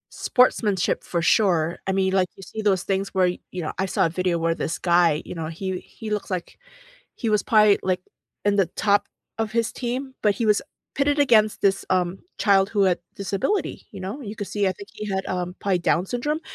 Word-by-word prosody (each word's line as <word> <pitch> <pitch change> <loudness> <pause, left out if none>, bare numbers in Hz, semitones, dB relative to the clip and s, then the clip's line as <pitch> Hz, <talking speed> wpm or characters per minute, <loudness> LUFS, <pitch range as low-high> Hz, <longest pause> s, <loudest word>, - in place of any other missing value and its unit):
Sportsmanship 210 -6 +2
for 170 -2 -2
sure. 175 -6 +2
I - - +2
mean, 190 0 +1
like, 185 -1 +3
you 195 - -12
see 220 - -6
those 195 -4 +2
things 195 0 -1
where 185 -1 +4
y 180 - -5
you 180 -2 -5
know, - - -3
I 190 - +1
saw - - +2
a - - +1
video 180 0 0
where 165 0 +1
this 165 - -3
guy, 170 -3 +3
you - - -7
know, 165 -2 -4
he 185 +3 -4
he 220 -2 -9
looks 210 -1 -2
like 180 - -5 0.6
he 230 - -3
was 210 -1 +2
pi 215 -3 +5
like, 185 -1 0 0.5
in 205 0 +3
the 195 - +4
top 205 -1 +2 0.3
of 225 -1 -2
his 230 -1 +1
team, 260 +2 -4
but 210 -2 +3
he 230 - -1
was 210 -1 +3 0.3
pitted 285 +1 +1
against 220 -6 +4
this, 195 -1 +2
um, 180 0 +1 0.2
child 195 -2 +4
who 205 -2 +2
had 180 -2 +2 0.2
disability, 200 - -1
you - - -9
know? 200 +10 -5
You 215 -2 -7
could 205 - -4
see, 205 -2 0
I - - 0
think, 200 +3 -12
he 210 - -7
had, 190 0 -2
um, 180 -1 -3
probably 190 -3 +1
Down 175 +2 +1
syndrome, 295 +7 -2
195 Hz, 220 wpm, -24 LUFS, 180-215 Hz, 0.6 s, pi